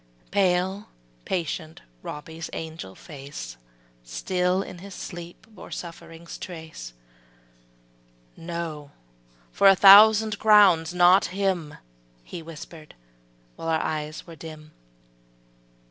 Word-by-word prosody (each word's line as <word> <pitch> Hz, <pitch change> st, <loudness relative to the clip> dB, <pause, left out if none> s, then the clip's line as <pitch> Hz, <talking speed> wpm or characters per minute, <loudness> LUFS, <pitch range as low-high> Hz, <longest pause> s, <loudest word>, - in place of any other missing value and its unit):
Pale, 190 Hz, +1 st, +1 dB, 0.4 s
patient 160 Hz, -2 st, -4 dB, 0.2 s
Robbie's 160 Hz, +2 st, -7 dB
angel 160 Hz, -12 st, -7 dB
face 135 Hz, -, -9 dB, 0.5 s
Still 180 Hz, -, -1 dB
in 180 Hz, -, -10 dB
his 195 Hz, +1 st, -10 dB
sleep 175 Hz, -1 st, -9 dB
bore 215 Hz, -4 st, -13 dB
suffering's 170 Hz, -1 st, -9 dB
trace; 160 Hz, -, -9 dB, 1.4 s
``No, 165 Hz, -4 st, -6 dB, 0.6 s
for 200 Hz, -, +4 dB
a 195 Hz, -, +8 dB
thousand 210 Hz, +2 st, +7 dB
crowns, 195 Hz, -6 st, +5 dB
not 180 Hz, +2 st, +5 dB
him,'' 185 Hz, -5 st, -2 dB, 0.5 s
He 170 Hz, -, -8 dB
whispered, 160 Hz, -1 st, -11 dB, 0.6 s
while -, -, -7 dB
our 160 Hz, -1 st, +2 dB
eyes 155 Hz, -1 st, -4 dB
were 165 Hz, -, -11 dB
dim. 155 Hz, 0 st, -11 dB
170 Hz, 100 wpm, -25 LUFS, 155-185 Hz, 1.4 s, a